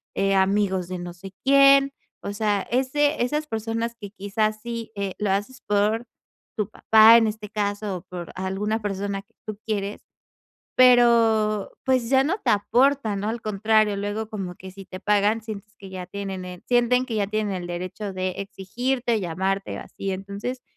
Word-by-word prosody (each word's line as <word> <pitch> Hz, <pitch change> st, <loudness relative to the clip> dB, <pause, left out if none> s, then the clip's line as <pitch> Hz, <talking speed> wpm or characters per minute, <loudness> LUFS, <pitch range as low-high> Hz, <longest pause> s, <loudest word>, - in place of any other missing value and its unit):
eh, 195 Hz, 0 st, +2 dB
amigos 190 Hz, -2 st, +2 dB
de 185 Hz, -1 st, -4 dB
no 175 Hz, 0 st, -6 dB
sé 190 Hz, +2 st, -11 dB
quién. 275 Hz, 0 st, +6 dB, 0.3 s
O 200 Hz, -, -3 dB
sea, 205 Hz, -1 st, 0 dB
ese 270 Hz, +4 st, +1 dB
esas 300 Hz, +5 st, -1 dB
personas 225 Hz, 0 st, -2 dB
que, 205 Hz, -2 st, -8 dB
quizás, 215 Hz, +1 st, -1 dB
sí, 230 Hz, -1 st, -5 dB
eh, 200 Hz, -2 st, -3 dB
lo 205 Hz, -2 st, 0 dB
haces 205 Hz, +7 st, -2 dB
por 210 Hz, +3 st, +1 dB, 0.5 s
tu 210 Hz, -1 st, -1 dB
papá, 220 Hz, +1 st, +7 dB
en 225 Hz, -1 st, +3 dB
este 210 Hz, -1 st, -5 dB
caso, 205 Hz, -2 st, -2 dB
o -, -, -10 dB
por 180 Hz, -2 st, -8 dB
alguna 195 Hz, +4 st, -2 dB
persona 200 Hz, -1 st, -3 dB
que -, -, -38 dB
tú 215 Hz, -1 st, -6 dB
quieres, 205 Hz, -2 st, -3 dB, 0.7 s
pero, 230 Hz, -4 st, +4 dB
pues 255 Hz, -3 st, +1 dB
ya 265 Hz, 0 st, +5 dB
no 360 Hz, +7 st, 0 dB
te -, -, +3 dB
aporta, 235 Hz, +2 st, +2 dB
¿no?, 200 Hz, +2 st, -2 dB
al 230 Hz, 0 st, -5 dB
contrario. 215 Hz, 0 st, +2 dB
Luego, 205 Hz, +2 st, -3 dB
como 195 Hz, -5 st, -5 dB
que 190 Hz, +1 st, -11 dB
si 195 Hz, +1 st, -11 dB
te 185 Hz, 0 st, -9 dB
pagan, 210 Hz, +2 st, +2 dB
sientes 210 Hz, -1 st, -8 dB
que 195 Hz, -3 st, -11 dB
ya 185 Hz, -1 st, -6 dB
tienen 195 Hz, -2 st, -5 dB
el 180 Hz, -1 st, -9 dB
sienten 245 Hz, +1 st, +3 dB
que 230 Hz, -4 st, -3 dB
ya 205 Hz, -2 st, +1 dB
tienen 210 Hz, 0 st, -1 dB
el 180 Hz, -1 st, -4 dB
derecho 185 Hz, +3 st, -5 dB
de 185 Hz, -1 st, -2 dB
exigirte, 235 Hz, +5 st, -2 dB
llamarte 190 Hz, +3 st, -2 dB
o -, -, -5 dB
así. 195 Hz, -1 st, -5 dB
Entonces, 200 Hz, +6 st, -5 dB
210 Hz, 180 wpm, -24 LUFS, 195-230 Hz, 0.7 s, papá